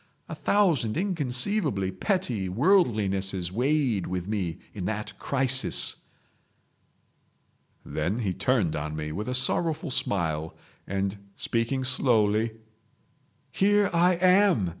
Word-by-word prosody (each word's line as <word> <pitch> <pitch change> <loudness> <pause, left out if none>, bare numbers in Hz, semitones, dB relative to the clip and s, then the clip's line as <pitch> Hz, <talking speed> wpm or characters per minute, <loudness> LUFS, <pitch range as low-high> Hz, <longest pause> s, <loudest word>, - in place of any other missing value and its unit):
A - - -6
thousand 165 - +1
inconceivably 145 - -1
petty 120 - -1
worldlinesses 100 - +1
weighed 125 -2 0
with 90 0 -4
me 95 -6 -2 0.2
in 95 -4 -5
that 105 +1 -4
crisis." 135 -1 +2 1.9
Then 85 +8 -2
he 105 -6 -1
turned 100 -4 0
on 75 +1 -4
me 75 0 -4
with 105 +8 -5
a 125 - -1
sorrowful 155 +4 +1
smile, 80 -9 -2 0.3
and, 100 +1 -2 0.2
speaking 115 +3 -1
slowly; 115 -4 +2 1.0
"Here 205 +3 +2
I 175 +2 +4
am!" 180 - +3
115 Hz, 105 wpm, -26 LUFS, 95-150 Hz, 1.9 s, I